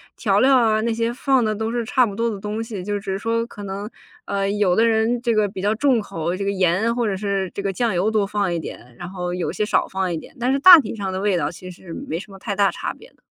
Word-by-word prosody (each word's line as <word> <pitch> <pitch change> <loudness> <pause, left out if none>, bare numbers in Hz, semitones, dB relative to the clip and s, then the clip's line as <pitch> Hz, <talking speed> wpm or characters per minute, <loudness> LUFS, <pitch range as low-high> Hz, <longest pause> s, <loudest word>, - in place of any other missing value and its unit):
调 200 -3 +1
料 265 +3 +5
啊， 220 -3 +2
那 230 +1 0
些 230 +1 -1
放 265 0 +2
的 215 - 0
都 220 +1 -3
是 235 -1 -2
差 255 +3 +3
不 205 -5 -2
多 230 +2 0
的 210 -3 -5
东 210 +3 -4
西。 215 -5 -6
就 205 +2 -2
只 195 -1 -5
是 190 - -1
说 230 +2 -1
可 235 -3 -11
能， 200 +1 -5 0.4
呃， 195 0 -1
有 200 -3 +2
的 225 +3 +4
人 225 +2 +1
这 240 -1 0
个 215 -1 +3
比 190 -1 -7
较 205 +2 +1
重 255 0 +2
口， 175 -4 -3
这 200 - -4
个 200 - -1
盐 190 +4 +1
或 240 -1 0
者 200 - -1
是 195 -1 -2
这 - - -4
个 195 0 -1
酱 230 +3 -1
油 185 +4 +1
多 215 -2 +1
放 200 -2 -1
一 170 - -1
点， 125 -6 -10
然 175 - -7
后 180 -1 -4
有 180 - -2
些 - - -2
少 210 - +1
放 190 -1 -2
一 165 - -2
点， 155 - -12
但 245 +2 +1
是 275 - +2
大 345 +4 +10
体 235 -5 -4
上 195 -3 -4
的 185 - -2
味 200 -2 +1
道 - - -1
其 185 +1 -10
实 175 -1 -11
没 160 - -5
什 205 +2 -11
么 195 - -12
太 200 +1 -4
大 200 0 +3
差 - - -4
别 470 - -17
的。 - - -33
205 Hz, 320 characters per minute, -21 LUFS, 190-230 Hz, 0.4 s, 大